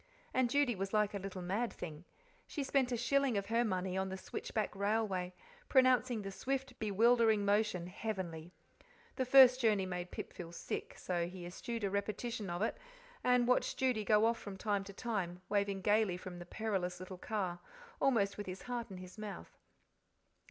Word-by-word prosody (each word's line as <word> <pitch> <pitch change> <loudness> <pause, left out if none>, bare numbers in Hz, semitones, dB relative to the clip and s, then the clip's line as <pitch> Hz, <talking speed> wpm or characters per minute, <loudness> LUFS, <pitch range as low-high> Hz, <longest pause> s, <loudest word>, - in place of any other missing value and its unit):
And 255 -2 +3
Judy 280 -1 +3
was 195 +1 -3
like 210 -1 +2
a 200 - -2
little 190 -1 -6
mad 210 +7 -1
thing. 160 0 -8 0.4
She 290 - -3
spent 270 -2 +1
a 240 - +1
shilling 265 0 +2
of 200 - -1
her 230 +1 +3
money 185 -4 -1
on 190 0 0
the 190 - -4
switchback 210 +2 -3
railway, 200 -3 0 0.4
pronouncing 255 -4 +4
the 195 - -5
swift, 265 +5 -3
bewildering 220 0 +4
motion 205 -3 +2
"heavenly." 180 -4 -4 0.7
The 260 - +1
first 255 -1 +8
journey 210 -5 +3
made 180 -1 -4
Pip - - -6
feel 170 -2 -8
sick, 170 - -5
so 175 -2 -1
he 180 0 -8
eschewed 230 +6 -5
a 200 - 0
repetition 210 +1 -2
of 175 +4 -1
it, 225 - -1 0.4
and 250 -1 +4
watched 250 - +2
Judy 255 -5 +1
go 210 +1 +4
off 230 0 +2
from 200 -2 -7
time 205 -1 0
to 200 - -9
time, 190 -6 -3
waving 200 -1 +1
gaily 210 -2 +3
from 180 -1 -8
the 175 - -9
perilous 185 -4 -2
little 185 0 -8
car, 185 -5 -2 0.4
almost 210 -7 +2
with 205 - -5
his 185 +1 -6
heart 240 -2 -4
in 190 - -8
his 185 +3 -10
mouth. 210 -2 -7
205 Hz, 180 wpm, -35 LUFS, 185-235 Hz, 0.7 s, first